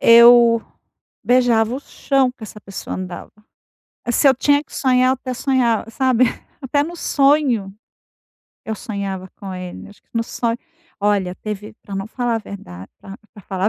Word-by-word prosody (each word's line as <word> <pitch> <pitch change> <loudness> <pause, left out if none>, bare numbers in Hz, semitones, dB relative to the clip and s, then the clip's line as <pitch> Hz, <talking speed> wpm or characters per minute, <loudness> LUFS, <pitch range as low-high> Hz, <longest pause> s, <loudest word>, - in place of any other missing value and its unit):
eu 235 0 +7 0.6
beijava 245 -2 +3
o 270 - -4
chão 270 -2 0
que 250 - -19
essa 210 0 -9
pessoa 195 -1 -6
andava. 185 -1 -7 0.8
Se 275 +3 +4
eu 265 - +5
tinha 285 +3 +3
que - - -16
sonhar 255 -1 +3
eu - - +4
até 255 0 -6
sonhava 240 -4 +1
sabe? 255 0 +3 0.4
Até 285 +2 +1
no 340 +3 -6
sonho 275 -11 +2 0.9
eu 220 - -3
sonhava 195 -3 -5
com 195 -1 -7
ele. 180 +1 -8
Acho 205 - -18
que - - -45
no 230 - +1
so 230 - -10 0.6
olha 200 -3 +1
teve 210 0 -6
pra 200 - -12
eu - - -2
não 195 +1 -3
falar 240 0 -1
a - - -1
verdade 95 - -10
pra 195 +1 -10 0.2
pra 205 - -13
falar 190 +1 -2
a - - +5
230 Hz, 175 wpm, -20 LUFS, 200-255 Hz, 0.9 s, eu